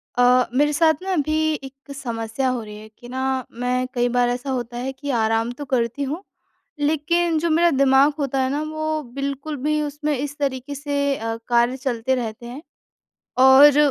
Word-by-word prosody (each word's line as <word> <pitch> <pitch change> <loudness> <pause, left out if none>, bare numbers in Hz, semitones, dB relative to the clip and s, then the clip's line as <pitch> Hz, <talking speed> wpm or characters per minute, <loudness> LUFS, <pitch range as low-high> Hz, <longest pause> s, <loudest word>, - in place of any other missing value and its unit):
अ, 250 0 +5
मेरे 295 +3 +2
साथ 315 +1 +4
ना 385 - -3
अभी 310 0 +1
एक 270 +1 -12
समस्या 235 0 -2
हो 250 -2 -2
रही 210 -1 -10
है 215 - -11
कि 240 - -12
ना 260 +1 -3 0.3
मैं 250 +1 -1
कई 245 -1 +1
बार 245 0 +2
ऐसा 250 +3 -3
होता 240 -2 -3
है 255 +2 -3
कि 285 +2 -7
आराम 225 +1 +1
तो 290 - -5
करती 240 +3 0
हूँ 305 +7 -4 0.6
लेकिन 320 +3 +1
जो 340 +2 0
मेरा 340 +2 +4
दिमाग 275 +1 +4
होता 275 -1 -1
है 260 - 0
ना 290 +2 -1
वो 310 0 -2
बिल्कुल 280 +2 -4
भी 305 0 +1
उसमें 295 0 -2
इस 285 +2 -5
तरीके 275 0 -3
से 280 -1 -1
अ, 225 0 -3
कार्य 240 +2 +2
चलते 255 -1 -1
रहते 235 -2 -5
हैं। 250 +5 -8 0.8
और 265 +2 +8
270 Hz, 185 wpm, -22 LUFS, 245-295 Hz, 0.8 s, और